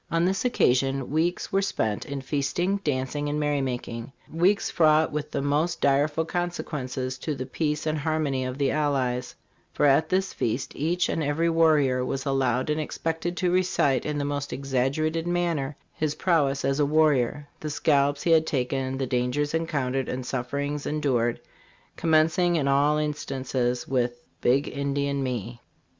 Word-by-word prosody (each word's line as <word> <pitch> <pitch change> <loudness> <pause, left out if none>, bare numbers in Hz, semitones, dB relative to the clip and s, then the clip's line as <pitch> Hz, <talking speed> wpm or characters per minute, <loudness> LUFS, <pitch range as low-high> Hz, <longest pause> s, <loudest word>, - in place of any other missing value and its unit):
this 185 +3 +1
occasion 135 - +1
weeks 165 +6 0
were 195 -1 +2
spent 110 - -1
in 140 -1 -4
feasting, 150 +8 0
dancing 145 -3 -2
and 150 +1 -1
merry 145 -1 +1
making, 120 -1 -4 0.2
weeks 180 +5 +2
fraught 155 -1 +4
with 150 0 -3
the 140 -2 -2
most 150 +4 0
direful 145 +3 +2
consequences 135 -7 -3
to 155 - -3
the 130 -1 -4
peace 150 +3 -2
and 155 -1 0
harmony 150 -3 0
of 130 0 -4
the 140 -2 +1
allies; 130 -4 -1 0.4
for 150 - +1
at 145 +3 +4
this 190 +1 0
feast 120 +4 -2
each 170 +5 0
and 165 - -1
every 160 +3 +1
warrior 150 -6 +3
was 135 +2 -3
al 135 - 0
lowed 130 -1 +1
and 155 +1 0
expected 165 +3 -3
to 180 +1 +1
recite 175 -8 +2
in 150 -1 -2
the 145 - -1
most 145 0 -3
exaggerated 140 +5 -1
manner 170 -6 -1 0.2
his 150 -1 -2
prowess 145 -7 +1
as 135 +1 +1
a 145 - +4
warrior; 145 -2 +2
the 155 - -4
scalps 145 -1 +2
he 170 - +2
had 160 -1 +5
taken, 130 0 -1
the 135 - -1
dangers 125 +4 0
encountered 140 -5 -1
and 125 0 -4
sufferings 140 +3 -3
endured, 125 -6 0 0.6
commencing 165 +2 +3
ia 150 -4 +1
all 140 +2 +3
instances 130 -4 -2
with 120 -2 0
' - - -41
Big 135 +4 +3
Indian 140 0 -1
me." 120 -2 -4
145 Hz, 165 wpm, -26 LUFS, 130-155 Hz, 0.6 s, had